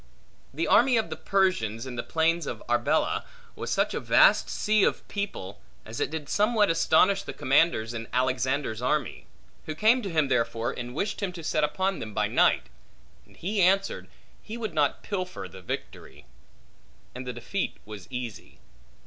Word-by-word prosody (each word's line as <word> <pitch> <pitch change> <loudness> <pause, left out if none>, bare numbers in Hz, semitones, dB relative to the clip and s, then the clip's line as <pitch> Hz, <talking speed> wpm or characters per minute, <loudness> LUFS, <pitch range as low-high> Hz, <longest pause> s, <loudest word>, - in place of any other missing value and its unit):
The 160 +5 -2
army 245 +2 +5
of 220 -7 -1
the - - -2
Persians, 135 - 0
in 130 -2 -6
the 120 - -2
plains 165 +5 0
of - - -5
Arbela, - - +1 0.3
was - - -5
such - - +1
a - - -1
vast - - +5
sea 215 -1 +2
of - - 0
people, 195 - -5 0.2
as 110 +1 -7
it - - 0
did 155 -1 -5
somewhat 210 -2 +3
astonish 185 +4 +3
the - - -7
commanders 130 -5 +2
in 115 0 -5
Alexander's 130 -1 0
army; 135 +1 -1 0.4
who 155 - -4
came 225 +8 +4
to 200 - -4
him 155 -4 +2
therefore, 115 -2 0
and 125 +1 -7
wished 200 +8 -2
him 195 -2 -1
to 170 -2 -8
set 155 0 0
upon 190 +6 0
them 110 -2 -7
by - - +2
night; - - +3 0.6
and - - -21
he 200 +3 -1
answered, 195 +2 +2 0.3
He 225 +2 -7
would 220 -5 -4
not 150 -3 +1
pilfer 185 - -4
the 95 +1 -12
victory. 90 - -7 0.9
And 125 0 -7
the 125 - -3
defeat 120 - -3
was 105 -3 -9
easy. 125 -4 -7
155 Hz, 175 wpm, -27 LUFS, 120-195 Hz, 0.9 s, army